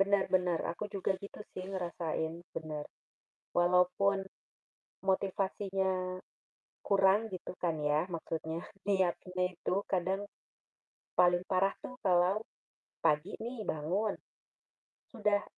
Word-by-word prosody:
Benar 200 0 +4
benar, 180 -2 +3
aku 210 +4 -5
juga 195 0 +1
gitu 200 +1 -9
sih 185 +1 -6
ngerasain, 170 -3 -2 0.2
benar. 155 -2 -3 0.7
Walaupun 180 +2 +4 0.8
motivasinya 190 -1 0 0.6
kurang 200 +2 +4
gitu 185 -1 -6
kan 165 -3 +1
ya 150 +2 +2
maksudnya, 165 0 -3 0.2
niatnya 185 -1 +1
itu 175 - -1 0.2
kadang, 190 +2 +1 0.9
paling 175 0 +6
parah 195 +1 +4
tuh 255 - -7
kalau 185 +4 +4 0.6
pagi 150 +6 +2
nih 235 0 -4
bangun, 185 +8 0 0.9
sudah 210 -3 +2
185 Hz, 100 wpm, -33 LUFS, 175-195 Hz, 0.9 s, paling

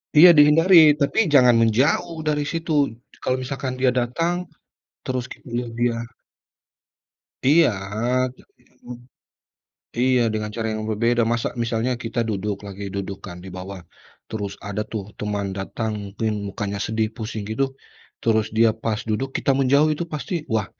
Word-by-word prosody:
Iya 170 +4 +10
dihindari, 155 +1 +7
tapi 145 +8 +2
jangan 125 -5 +6
menjauh 135 +8 +1
dari 150 -1 0
situ. 150 -7 0 0.2
Kalau 130 - 0
misalkan 130 0 -4
dia 130 0 +2
datang 165 +9 -1 0.6
terus 130 -1 -3
kita - - -12
lihat 120 -1 -2
dia 120 -1 0 1.4
Iya, 155 +3 +6 0.7
jak - - -20 0.2
minimum 125 -1 -12 1.0
iya, 125 0 +3
dengan 105 0 -2
cara 115 -1 -2
yang 110 - -4
berbeda. 115 +2 +1
Masa 115 0 0 0.2
misalnya 115 +2 -1
kita 115 +1 -3
duduk, 105 0 -2
lagi 100 +1 -8
duduk, 100 0 -4
kan, 90 - -8
di - - -8
bawah, 95 +1 -7 0.5
terus 105 -3 -4 0.2
ada, 100 +1 -2
tuh, 110 -3 -3 0.2
teman 105 -1 -2
datang 110 +3 -3
mungkin 105 +2 -3 0.2
mukanya 100 0 -4
sedih 110 0 0
pusing 110 -2 -5
gitu, 125 +5 0 0.6
terus 110 -2 +2
dia 115 0 +6
pas 110 -1 0
duduk 130 +6 -1
kita - - +1
menjauh 140 +3 +4
itu 150 - -3
pasti, 145 +2 -4 0.2
wah, 110 -2 +1
120 Hz, 145 wpm, -22 LUFS, 110-140 Hz, 1.4 s, Iya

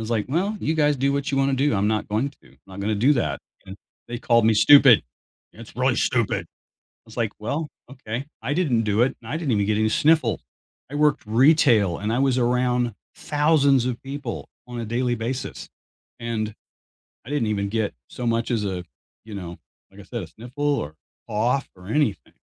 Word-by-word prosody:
was 110 +1 -5
like, 110 -3 0
"Well, 190 +9 0
you 160 - 0
guys 150 -2 +2
do 140 +2 +1
what 140 0 -1
you 135 - 0
wanna 135 0 +2
do, 135 -2 +1
I'm 100 +1 +1
not 110 -1 -1
going 115 +7 0
to. 140 - -23
I'm - - -24
not 95 +1 -9
gonna 105 +2 0
do 130 +8 +4
that." 120 - -1 0.3
And 95 - -9 0.3
they 120 0 -4
called 115 -1 +3
me 110 - +4
stupid, 135 +1 +7 0.5
you - - -20
know, - - -8
"It's - - -14
really - - +2
stupid." - - +1
I - - -64 0.4
was 110 - -14
like, 115 -3 -1
"Well, 145 +9 -3 0.2
okay." 130 -1 -6 0.2
I 135 +5 -2
didn't 145 -10 +1
do 105 +1 +1
it, 135 +2 +1
and 115 - -9
I - - 0
didn't 145 -7 -1
even 105 -1 +2
get 105 0 +1
any 110 0 +2
sniffle. 145 -3 +2 0.5
I - - -8
worked 150 -1 +2
retail, 115 - +4
and 105 +2 -2
I 120 - +1
was 135 -1 +2
around 125 -1 +1 0.2
thousands 145 -4 +2
of 125 -2 -3
people 140 +2 -6 0.2
on 120 -1 -7
a - - -3
daily 120 +2 0
basis, 120 +3 -4 0.5
and 110 -2 -3 0.7
I - - -10
didn't 145 -6 0
even 100 -1 -1
get 110 -1 -1
so 125 - -6
much 115 0 0
as 110 -3 0
a, 95 -2 -3 0.4
you 110 -2 -8
know, 85 -3 -7 0.3
like - - -16
I - - -10
said, - - -5
a - - -8
sniffle 125 +6 -9 0.2
or 75 +2 -6 0.3
cough 120 +6 0
or 90 0 -14
anything. 115 -5 -1
120 Hz, 210 wpm, -23 LUFS, 110-140 Hz, 0.7 s, stupid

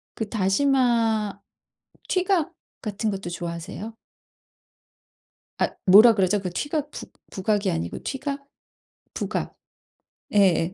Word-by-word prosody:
그 220 -2 -4
다시마 225 -1 +1 0.7
튀각 370 -4 +1 0.3
같은 215 0 -2
것도 195 -2 -5
좋아하세요? 175 +6 -6 1.6
앗 - - -1
뭐라 215 +5 +9
그러죠? 195 0 +2
그 190 -2 -4
튀각 295 - -3
부 - - -8 0.2
부각이 200 +1 0
아니고 85 +1 -3
튀각? 280 +1 -4 0.7
부각. - - -3 0.8
예예. 185 -4 +3
210 Hz, 205 characters per minute, -24 LUFS, 190-260 Hz, 1.6 s, 뭐라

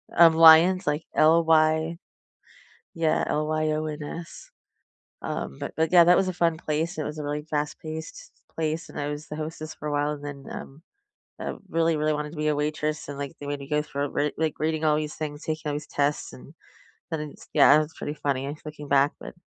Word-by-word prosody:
um, 165 -1 +8
Lyons, 165 +2 +7
like 150 +2 0
L-Y 160 0 +4 1.0
yeah, 160 -1 +1
L-Y-O-N-S. 155 +1 -3 0.7
Um, 70 +1 -4
but - - -5
but, 160 +1 +1
yeah, 175 -1 +8
that 180 +1 +6
was 195 - +2
a 185 - -2
fun 170 -2 +1
place. 160 +3 -2
It 155 - -2
was 150 +1 -5
a - - -4
really 150 +1 -3
fast 150 -1 -3
paced 160 0 -8 0.2
place, 160 +1 -2
and - - -7
I 145 - -2
was 150 +1 -6
the 150 - -6
hostess 155 0 -6
for 150 - -6
a - - -2
while. 145 0 +1
And 145 -1 -9
then, 140 -1 -7
um, 140 +4 -9 0.6
I - - -3 0.2
really, 165 -1 +2
really 155 0 +1
wanted 150 0 -3
to 160 - -11
be 155 0 -1
a 150 - +2
waitress 150 0 -2
And, 140 -1 -6
like, 140 -1 -5
they 145 - -8
made 145 0 -3
me 140 - -9
go 150 0 +2
through 140 -1 -3
re 150 0 0
like, 160 -2 0
reading 155 0 -1
all 150 -1 +4
these 155 -1 -3
things, 150 -1 -5
taking 155 -1 -3
all - - -2
these 150 0 -5
tests, 145 - -1
and 65 0 -13 0.6
then 160 -2 -2
it's, - - -16
yeah. 145 - +7
It - - +6
was 155 +1 -4
pretty 150 - -5
funny 140 0 -2
looking 150 -1 -8
back. 140 +1 +4
But - - -9
155 Hz, 215 wpm, -26 LUFS, 145-160 Hz, 1.0 s, um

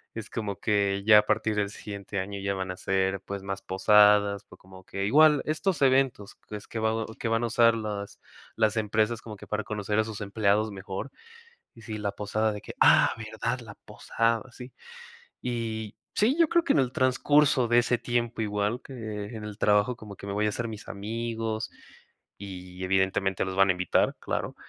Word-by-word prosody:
es 110 -1 -6
como 105 -4 -4
que 100 -2 +1
ya 105 -1 +8
a - - +4
partir 110 0 0
del 105 -1 0
siguiente 100 -1 -6
año 100 +1 -4
ya 100 0 -1
van 95 -1 -3
a 90 - -7
ser, 95 0 0
pues, 100 0 -6
más 95 0 -4
posadas, 100 +1 +4
fue 95 - -16
como 95 0 -15
que 100 0 -3
igual 150 +6 +5
estos 155 +2 -1
eventos 130 -6 +2
que 105 - -11
es 105 - -9
que 115 - -5
va 110 0 0
que 115 - -2
van 115 +1 +1
a - - +1
usar 115 0 +4
las 105 -2 -5 0.4
las 110 -1 +2
empresas 110 +1 0
como 110 -2 -9
que - - -12
para 105 0 -2
conocer 105 0 -2
a - - +4
sus 110 -2 -7
empleados 105 +1 +1
mejor. 95 +6 -6 0.6
Y 115 - -15
sí, 110 -1 -6
la 100 -1 -2
posada 105 +2 -1
de 105 - -6
que: - - -9
''Ah, - - +6
verdad, - - -3
la - - -11
posada'', 115 +2 -2
sí. 125 +1 -11 0.7
Y 110 -3 -4 0.2
sí, 235 +7 +2
yo 335 - +5
creo 340 - +4
que 335 - +2
en - - +3
el 125 -2 -1
transcurso 130 0 +3
de 120 +1 +4
ese 120 +1 +3
tiempo, 120 -1 -2
igual 105 +3 -1
que - - -11 0.4
en 110 - -7
el 105 -1 -7
trabajo, 105 +4 +2
como 105 -3 -10
que 100 - -10
me 100 - -3
voy 105 +1 0
a 105 - +2
hacer 115 +3 -3
mis 110 -1 -9
amigos 110 +1 -4 0.7
y, 95 -2 -8
evidentemente, 95 0 +1
los 95 0 -4
van 95 0 +5
a - - +6
invitar, 90 0 +1
claro. - - -3
105 Hz, 200 wpm, -27 LUFS, 100-115 Hz, 0.7 s, ya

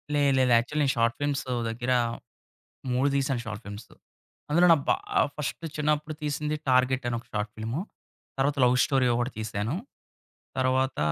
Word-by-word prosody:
లేదు 145 -1 +3
లేదు. 130 -1 +3
యాక్చువల్లీ 145 +5 0
నేను 135 - +2
షార్ట్ 115 +1 +2
ఫిల్మ్స్ 145 -1 0 0.3
దగ్గర 120 +3 -2 1.0
3 130 +3 +2
తీసాను 135 -2 0
షార్ట్ 110 +1 -6
ఫిల్మ్సు. 100 +2 -9 0.6
అందులో 170 +4 +5
నా - - +7
బా - - +4 0.4
ఫస్ట్ 150 +2 -4
చిన్నప్పుడు 150 0 0
తీసింది 150 +1 -1
టార్గెట్ 130 0 +3
అని 120 - -1
ఒక - - -24
షార్ట్ 105 0 -2
ఫిల్ము. 115 +8 -3 0.6
తర్వాత 140 +2 +1
లవ్ 125 0 +4
స్టోరీ 135 -2 +2
ఒకటి 120 +2 -1
తీశాను. 110 +5 -2 0.8
తర్వాత 130 +1 +1
130 Hz, 150 wpm, -27 LUFS, 120-145 Hz, 1.0 s, నా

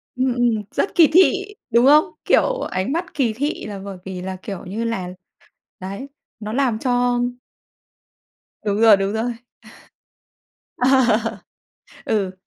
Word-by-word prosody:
Ừm, 255 -1 +1
ừm, 245 -1 +2 0.2
rất - - -2
kỳ 330 -3 +7
thị, 390 +3 +3
đúng 235 +2 +4
không? 300 +2 +6 0.2
Kiểu, - - +2
ánh 185 +8 -2
mắt 345 +3 -3
kỳ 245 -6 0
thị 285 +6 -3
là 205 -2 -6
bởi 195 -1 -8
vì 185 -1 -6
là, 190 0 -5
kiểu, 195 -3 -7
như 210 +5 -4
là 190 -6 -3 0.7
đấy, 200 +9 -6 0.3
nó 215 0 -5
làm 250 -4 +1
cho 245 0 +1 1.5
Đúng 205 +1 -1
rồi, 220 -3 +7
đúng 195 +1 -1
rồi. 235 +2 -1 1.4
Ờ. 245 -3 +2 0.7
Ừ. 200 -4 -1
230 Hz, 140 wpm, -21 LUFS, 200-265 Hz, 1.5 s, kỳ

